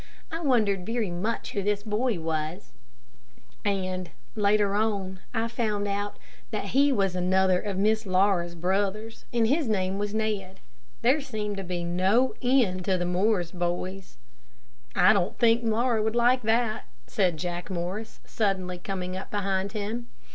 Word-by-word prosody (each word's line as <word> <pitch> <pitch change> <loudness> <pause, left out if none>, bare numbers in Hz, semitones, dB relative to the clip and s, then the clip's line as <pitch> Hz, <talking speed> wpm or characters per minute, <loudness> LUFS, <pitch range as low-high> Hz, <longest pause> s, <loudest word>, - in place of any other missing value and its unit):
I 325 +1 -3
wondered 215 - +2
very 225 -1 -1
much 200 +7 -2
who 200 - -1
this 205 +1 0
boy 215 -1 0
was, 160 +3 -3 0.9
and, 185 -3 -1 0.3
later 205 -1 +3
on, 200 -3 -1
I 230 -1 0
found 215 -3 -1
out 205 +1 -2 0.3
that - - -3
he 280 +1 +4
was 195 -7 +1
another 185 0 +3
of 200 -3 -3
Miss 215 +1 +2
Laura's 185 -2 +2
brothers, 200 +5 -1
and 235 -2 +2
his 280 +4 +2
name 195 -2 0
was 205 0 -1
Ned. 205 -4 -2 0.4
There 265 +6 +4
seemed 215 -6 -4
to 195 - -3
be 180 -1 -3
no 190 +9 +2
end 245 -8 +2
to 190 -1 +2
the 175 - -1
Morris 180 -1 +1
boys. 180 +1 -3 0.8
"I 180 +4 +6
don't 195 -2 0
think 235 0 +4
Laura 230 0 +2
would 220 +1 0
like 245 +2 +4
that," 225 0 +1 0.2
said 180 -5 +1
Jack 175 +1 -4
Morris, 190 +5 -4
suddenly 185 -4 -1
coming 185 -1 -4
up 190 - -6
behind 195 -1 -1
him. 220 +3 -3
200 Hz, 155 wpm, -27 LUFS, 185-220 Hz, 0.9 s, I